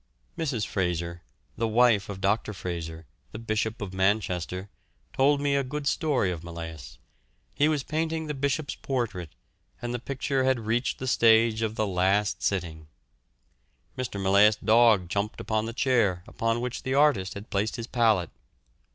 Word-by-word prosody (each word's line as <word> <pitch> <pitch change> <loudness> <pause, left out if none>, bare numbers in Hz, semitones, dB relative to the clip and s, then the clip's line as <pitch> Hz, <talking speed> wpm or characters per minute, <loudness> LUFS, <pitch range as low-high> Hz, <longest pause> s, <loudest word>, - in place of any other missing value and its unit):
Mrs. 135 -10 -1
Fraser, 85 -2 -2 0.4
the 115 +1 0
wife 110 -3 +3
of 95 -2 -6
Dr. 105 +2 0
Fraser, 80 -2 -5 0.3
the - - -5
Bishop 110 -1 -2
of 95 -2 -6
Manchester, 95 -1 0 0.5
told 140 +2 +3
me 140 0 +1
a 140 - +2
good 145 +3 -5
story 140 - +1
of 85 -2 -6
Millais. 80 -6 -8 0.6
He 145 - +3
was 150 -3 0
painting 160 +2 -2
the 150 - -3
Bishop's 140 +2 -1
portrait, 110 - -4 0.4
and 120 0 -4
the 120 - -2
picture 135 +1 -1
had 130 -2 +2
reached 115 +3 -1
the 130 - -5
stage 115 -2 +4
of 110 -1 -1
the 110 - 0
last 95 +2 +1
sitting. 80 -5 -2 1.1
Mr. 125 -5 -4
Millais' 100 +2 +5
dog 110 -4 +4
jumped 100 +4 -2
upon 110 0 -1
the - - -3
chair 115 -8 +1
upon 115 +1 -1
which 125 0 -4
the 130 +1 -2
artist 120 -11 +3
had 100 +2 -9
placed 105 +2 0
his 115 - -5
palette. 110 -8 +2
110 Hz, 160 wpm, -27 LUFS, 95-130 Hz, 1.1 s, Millais